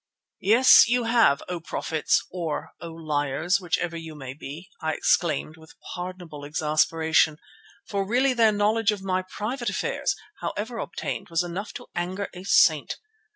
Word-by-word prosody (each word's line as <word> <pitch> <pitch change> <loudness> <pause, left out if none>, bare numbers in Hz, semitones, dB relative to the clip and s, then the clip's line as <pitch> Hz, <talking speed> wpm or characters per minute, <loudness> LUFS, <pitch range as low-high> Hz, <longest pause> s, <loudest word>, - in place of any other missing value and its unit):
"Yes, 235 +5 +7
you 245 +1 +2
have, 230 -12 +3
O 180 -1 -3
Prophets, 160 -1 0
or 170 -4 -4
O 170 - -6
Liars, 155 +2 0
whichever 175 -1 -1
you 160 -2 -7
may 135 -3 -7
be," 150 +5 -9
I 160 0 -1
exclaimed 155 0 +1
with 160 0 -16 0.2
pardonable 175 -4 -7
exasperation, 155 +1 +2 0.5
for 200 -1 -1
really 250 +6 +2
their 225 -3 +4
knowledge 215 +2 +2
of 205 -2 -5
my 185 -1 0
private 230 +7 -4
affairs, - - -1 0.2
however 225 +3 -4
obtained, - - -5
was 165 +1 +1
enough 180 +4 -5
to - - -8
anger 185 +3 -3
a 180 0 -9
saint. 160 -5 +4
175 Hz, 150 wpm, -25 LUFS, 160-205 Hz, 0.5 s, Yes